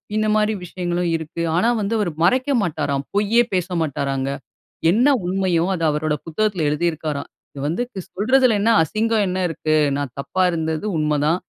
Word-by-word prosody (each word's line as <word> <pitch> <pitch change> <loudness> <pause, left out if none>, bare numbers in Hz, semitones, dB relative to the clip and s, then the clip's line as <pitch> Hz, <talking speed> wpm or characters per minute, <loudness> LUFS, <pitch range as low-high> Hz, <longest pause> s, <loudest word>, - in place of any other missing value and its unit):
இந்த 215 0 +1
மாரி 215 0 +2
விஷயங்களும் 175 -1 -2
இருக்கு. 160 +1 -5
ஆனா 185 +7 +3
வந்து 205 +2 -1
க் - - +2
அவரு 195 -5 0
மறைக்க 255 +10 +2
மாட்டாராம். 145 -6 -1
பொய்யே 210 +3 +3
பேச 180 -2 0
மாட்டாராங்க. 135 -3 -2 0.6
என்ன 235 +8 +3 0.2
உண்மையோ! 180 -2 +1
அத 165 - -4
அவரோட 150 0 -1
புத்தகத்துல 180 0 -1
எழுதி 150 +3 -1
இருக்கிறாராம். 150 -2 -5 0.2
இது 140 - -7
வந்து 170 +11 -1 0.3
சொல்றதிலன்னா, 230 0 +3
அசிங்கம் 215 +5 0
என்ன 185 0 -2
இருக்கு? 155 -1 -1 0.2
நான் 140 -4 -4
தப்பா 185 +7 -2
இருந்தது 160 +1 -2
உண்ம 150 -1 +1
தான். 165 +4 +2
175 Hz, 160 wpm, -21 LUFS, 155-210 Hz, 0.6 s, ஆனா